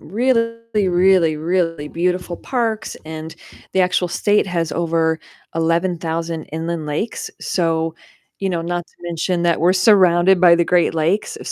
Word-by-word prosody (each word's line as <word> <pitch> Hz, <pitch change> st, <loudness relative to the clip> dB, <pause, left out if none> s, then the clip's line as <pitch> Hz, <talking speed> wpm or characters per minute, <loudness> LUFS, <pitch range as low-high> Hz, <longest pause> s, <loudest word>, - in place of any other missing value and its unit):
really, 230 Hz, 0 st, 0 dB, 0.3 s
really, 180 Hz, -3 st, +3 dB
really 165 Hz, -2 st, -1 dB
beautiful 180 Hz, +1 st, -2 dB
parks 230 Hz, -2 st, -2 dB
and 160 Hz, 0 st, -7 dB, 0.4 s
the 190 Hz, -, +2 dB
actual 180 Hz, 0 st, +1 dB
state 205 Hz, +4 st, +1 dB
has 170 Hz, -3 st, -2 dB
over 165 Hz, -1 st, 0 dB, 0.4 s
11,000 165 Hz, -1 st, -1 dB
inland 160 Hz, 0 st, -4 dB
lakes, 155 Hz, +10 st, -3 dB
so 165 Hz, -2 st, -1 dB, 0.5 s
you 195 Hz, -, -1 dB
know, 170 Hz, -2 st, -2 dB
not 175 Hz, 0 st, -3 dB
to -, -, -30 dB
mention 175 Hz, +1 st, -2 dB
that 170 Hz, -1 st, +1 dB
we're 175 Hz, +2 st, +4 dB
surrounded 185 Hz, -2 st, +4 dB
by 175 Hz, -2 st, +7 dB
the 170 Hz, -, +2 dB
Great 175 Hz, -1 st, +2 dB
Lakes, 165 Hz, +6 st, 0 dB
175 Hz, 140 wpm, -19 LUFS, 165-185 Hz, 0.5 s, by